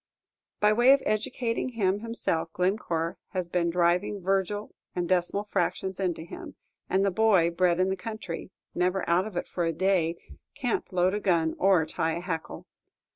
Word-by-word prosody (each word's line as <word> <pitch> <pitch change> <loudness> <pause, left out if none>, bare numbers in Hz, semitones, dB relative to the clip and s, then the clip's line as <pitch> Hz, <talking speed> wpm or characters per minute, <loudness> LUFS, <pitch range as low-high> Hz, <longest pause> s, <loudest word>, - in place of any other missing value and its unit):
By 210 0 +4
way 240 +4 +6
of 280 - +1
educating 230 +3 -1
him 200 -3 +1
himself, 175 -8 -2
Glencore 175 -3 -1
has 185 -2 -2
been 170 -1 0
driving 175 +4 +1
Virgil 195 +2 -1 0.2
and 175 -1 -1
decimal 185 +3 +1
fractions 190 -2 -2
into 175 -4 -1
him; 170 - -9 0.3
and 195 +1 +2
the 195 - +2
boy, 190 -4 +4
bred 175 0 +2
in 185 +1 +3
the 190 - 0
country, 215 -5 -6 0.2
never 180 +1 0
out 175 +4 +2
of 200 -5 -7
it - - -2
for 175 - -2
a 165 - +1
day, 175 -1 +1 0.4
can't 250 -4 -2
load 185 +1 +2
a 210 - 0
gun 170 -5 +2
or 185 -4 +4
tie 160 +1 -1
a 170 - -3
hackle. 170 -3 -5
185 Hz, 175 wpm, -27 LUFS, 170-205 Hz, 0.4 s, way